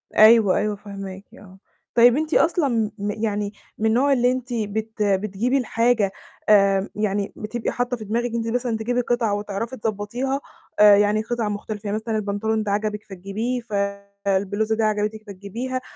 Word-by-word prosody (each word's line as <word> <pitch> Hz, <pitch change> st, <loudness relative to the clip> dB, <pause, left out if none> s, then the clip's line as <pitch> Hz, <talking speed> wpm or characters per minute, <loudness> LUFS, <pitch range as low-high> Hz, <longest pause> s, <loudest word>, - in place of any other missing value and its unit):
أيوه، 215 Hz, -3 st, +7 dB
أيوه، 210 Hz, 0 st, 0 dB
فاهماكِ 195 Hz, -1 st, -8 dB
آه. 195 Hz, -2 st, -15 dB, 0.4 s
طيب 240 Hz, +2 st, +6 dB
أنتِ 315 Hz, +1 st, -2 dB
أصلًا 270 Hz, -, +2 dB
م 205 Hz, 0 st, -2 dB
يعني 205 Hz, -1 st, -1 dB, 0.2 s
من 220 Hz, -, -2 dB
النوع 250 Hz, +6 st, +3 dB
اللي 245 Hz, -1 st, +3 dB
أنتِ 255 Hz, -1 st, -4 dB
بت 220 Hz, 0 st, -2 dB
بتجيبي 205 Hz, +5 st, +1 dB
الحاجة 230 Hz, -4 st, +1 dB, 0.4 s
آآ، 195 Hz, -1 st, +4 dB
يعني 205 Hz, -1 st, -1 dB
بتبقي 225 Hz, +2 st, -3 dB
حاطّة 245 Hz, 0 st, -2 dB
في 215 Hz, -, -8 dB
دماغِك 235 Hz, +3 st, -1 dB
أنتِ 230 Hz, -1 st, -2 dB
مثلًا 235 Hz, -1 st, -1 dB
تجيبي 245 Hz, +3 st, 0 dB
قطعة 240 Hz, -3 st, 0 dB
وتعرفي 210 Hz, +4 st, -4 dB
تضبّطيها، 225 Hz, +5 st, -2 dB, 0.4 s
آآ، 210 Hz, -1 st, +9 dB
يعني 210 Hz, +1 st, +3 dB
قِطع 225 Hz, -1 st, -2 dB
مختلفة 210 Hz, 0 st, -5 dB
يعني 205 Hz, +1 st, -1 dB
مثلًا 220 Hz, 0 st, -2 dB
البنطلون 215 Hz, +1 st, -1 dB
ده 205 Hz, -, -2 dB
عجبِك 210 Hz, 0 st, -1 dB
فتجيبيه 205 Hz, +6 st, -4 dB
فالبلوزة 200 Hz, 0 st, -2 dB
دي 225 Hz, -, 0 dB
عجبِتِك 215 Hz, 0 st, -1 dB
فتجيبيها 225 Hz, +7 st, -5 dB
215 Hz, 160 wpm, -23 LUFS, 205-235 Hz, 0.4 s, آآ